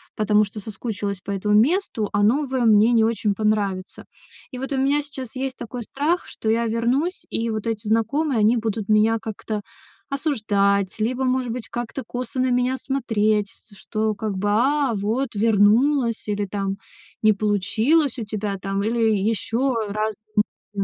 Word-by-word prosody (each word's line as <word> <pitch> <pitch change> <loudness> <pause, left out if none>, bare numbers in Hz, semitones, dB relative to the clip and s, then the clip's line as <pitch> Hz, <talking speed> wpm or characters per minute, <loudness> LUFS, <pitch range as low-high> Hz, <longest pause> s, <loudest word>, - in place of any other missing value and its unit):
потому 210 0 +3
что 210 +2 -9
соскучилась 205 -2 -4
по 200 - -6
этому 210 +1 0
месту, 235 - +2
а 205 0 +2
новое 265 +3 +2
мне 220 +2 +5
не 225 -1 +4
очень 220 -3 +1
понравится. 205 -3 -1 0.5
И 250 - -7
вот 270 +3 -5
у 270 - 0
меня 280 +2 +2
сейчас 270 -3 -8
есть 265 0 -3
такой 240 +1 -6
страх, 300 +9 -1
что 220 - -4
я 230 +1 +2
вернусь, 245 +10 0
и 230 0 -2
вот 220 0 -3
эти 220 -1 -3
знакомые, 230 +5 +1
они 215 +3 +4
будут 220 -2 -2
меня 215 +1 +4
как-то 215 -1 -5 0.5
осуждать, 205 - +1
либо 255 +4 0
может 255 -2 0
быть 245 -1 -5
как-то 240 +2 -5
косо 250 +1 -4
на 255 0 +2
меня 250 +1 +1
смотреть, 215 -6 0
с 215 - -19
что 215 0 -2
как 210 -2 -3
бы 205 +2 0
"а, 265 +4 +2
вот 220 +5 -1
вернулась" 230 +4 +3
или 205 0 0
там 195 0 -3 0.4
"не 215 -1 +5
получилось 220 - +1
у 230 - -2
тебя 205 -1 -3
там" 195 +1 -2
или 230 +2 0 0.2
ещё 225 +5 0
разные 215 -2 -3 0.7
мысли 200 - -1
225 Hz, 165 wpm, -23 LUFS, 210-255 Hz, 0.7 s, мне